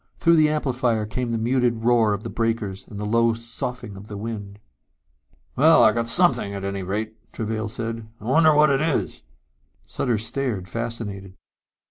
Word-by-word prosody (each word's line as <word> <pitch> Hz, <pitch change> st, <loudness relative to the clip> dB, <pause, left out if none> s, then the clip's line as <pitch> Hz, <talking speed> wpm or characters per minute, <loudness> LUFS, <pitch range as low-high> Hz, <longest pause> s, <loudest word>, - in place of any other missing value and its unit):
Through 170 Hz, -1 st, +4 dB
the 155 Hz, -1 st, +5 dB
amplifier 125 Hz, -7 st, 0 dB
came 120 Hz, +3 st, -3 dB
the 115 Hz, -, 0 dB
muted 120 Hz, 0 st, 0 dB
roar 115 Hz, -4 st, +3 dB
of 100 Hz, -, -9 dB
the -, -, -5 dB
breakers 115 Hz, -4 st, -2 dB
and 100 Hz, -, -9 dB
the 105 Hz, -, -3 dB
low 115 Hz, +1 st, +2 dB
soughing 115 Hz, -1 st, -4 dB
of 100 Hz, +2 st, -11 dB
the 105 Hz, -, -7 dB
wind. 100 Hz, -2 st, -6 dB, 1.0 s
"Well, 160 Hz, +5 st, +6 dB
we 110 Hz, -, +6 dB
got 115 Hz, 0 st, -1 dB
something 115 Hz, -, +2 dB
at 100 Hz, -, -6 dB
any 100 Hz, 0 st, -3 dB
rate," 110 Hz, +4 st, -5 dB
Travail 110 Hz, 0 st, -3 dB
said. 115 Hz, -1 st, -5 dB
"I 105 Hz, -, -12 dB
wonder 155 Hz, +6 st, +5 dB
what 150 Hz, 0 st, +5 dB
it 135 Hz, 0 st, +2 dB
is." 160 Hz, -3 st, -1 dB, 0.6 s
Sutter 115 Hz, -, -1 dB
stared, 115 Hz, -3 st, -3 dB
fascinated. 105 Hz, -4 st, -5 dB
115 Hz, 170 wpm, -23 LUFS, 105-125 Hz, 1.0 s, Well